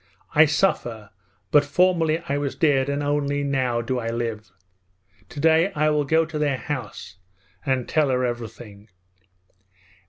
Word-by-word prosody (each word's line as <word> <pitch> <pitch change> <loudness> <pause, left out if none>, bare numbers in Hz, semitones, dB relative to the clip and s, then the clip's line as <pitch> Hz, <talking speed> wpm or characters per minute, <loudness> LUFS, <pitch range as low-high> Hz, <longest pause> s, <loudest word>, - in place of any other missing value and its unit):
I 155 +1 +7
suffer; 120 - -1 0.4
but 145 - +6
formerly 165 +1 +1
I 140 +1 -1
was 140 -2 -3
dead 140 -4 +2
and 140 +1 -1
only 145 0 0
now 130 -4 0
do 125 +2 -2
I 115 -1 -3
live. 115 -2 -4 0.8
Today 160 +5 +2
I 155 0 +2
will 150 -1 +1
go 160 +3 +2
to 155 -1 -5
their 145 -3 0
house 110 -10 -6 0.5
and 130 -2 0
tell 155 -3 +1
her 130 -1 +1
everything.' 115 -3 -7
140 Hz, 145 wpm, -23 LUFS, 120-150 Hz, 0.8 s, I